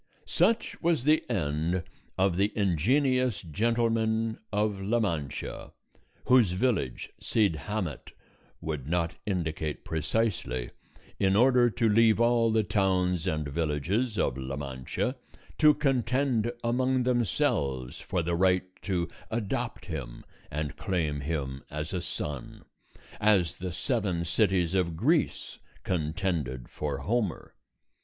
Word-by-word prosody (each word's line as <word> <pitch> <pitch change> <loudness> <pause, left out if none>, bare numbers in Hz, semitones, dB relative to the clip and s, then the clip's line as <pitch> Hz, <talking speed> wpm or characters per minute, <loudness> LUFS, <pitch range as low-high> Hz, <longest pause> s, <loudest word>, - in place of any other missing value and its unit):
Such 220 +7 +1
was 165 -6 +2
the 155 +3 +4
end 80 +2 0 0.3
of 95 -2 +2
the 100 +3 +2
Ingenious 125 - +2
Gentleman 115 +4 0
of 105 -1 0
La 110 +5 +1
Mancha, 80 - -3 0.5
whose 120 -8 +5
village 95 - -1
Cid 105 -7 +2
Hamet 95 -10 -3 0.5
would 75 -4 -4
not 85 0 0
indicate 80 -5 -2
precisely, 80 - -1 0.5
in 95 -1 +3
order 125 +1 +5
to 115 0 +1
leave 110 +1 +5
all 115 -1 +4
the 110 0 +3
towns 90 -3 +1
and 75 -4 -1
villages 85 - -1
of 65 - 0
La 65 +1 -4
Mancha 70 - -3 0.4
to 150 -1 +7
contend 125 -3 +1
among 130 +2 +1
themselves 70 - 0
for 90 -3 -1
the 85 +1 -1
right 90 +1 +3 0.2
to 90 -4 -1 0.2
adopt 115 +2 -3
him 70 -9 -6 0.2
and 75 0 -4
claim 85 -8 -1
him 70 -3 -3
as 75 +4 -4
a 90 - -1
son, 75 -6 -5 0.5
as 95 -7 +3
the 90 0 -4
seven 95 -4 -1
cities 90 -1 +2
of 85 -4 0
Greece - - +1 0.2
contended 80 -6 -2
for 75 -2 -3
Homer. 105 - -1
95 Hz, 120 wpm, -28 LUFS, 80-115 Hz, 0.5 s, to